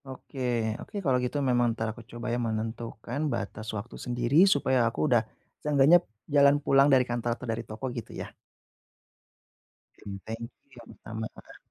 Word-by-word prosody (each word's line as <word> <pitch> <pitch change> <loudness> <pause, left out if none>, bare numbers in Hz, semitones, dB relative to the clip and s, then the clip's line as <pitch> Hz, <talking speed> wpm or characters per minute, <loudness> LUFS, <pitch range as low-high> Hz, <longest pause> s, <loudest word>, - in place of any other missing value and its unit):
Oke, 135 +1 -10 0.4
oke, - - -11
kalau 130 -2 +3
gitu 125 +3 -2
memang 120 -2 +2
entar 110 - -1
aku 120 - -11
coba, 120 +1 -7
ya, 120 - 0
menentukan 115 +2 -4
batas 110 0 -4
waktu 105 +4 -7
sendiri 125 +10 +4
supaya 130 -7 +3
aku 115 - -1
udah 120 -6 +4 0.4
seenggaknya 150 +3 +5 0.2
jalan 145 -1 +5
pulang 135 -1 +5
dari 130 -2 +5
kantor 120 -1 -2
atau - - -8
dari 115 +1 -2
toko, 110 +5 -6
gitu 120 -3 -6
ya. - - -8 1.7
Genteng 105 +3 -7 0.3
yang 120 -2 -13
sama. 110 0 -4
Heeh. - - -14
120 Hz, 155 wpm, -28 LUFS, 115-135 Hz, 1.7 s, seenggaknya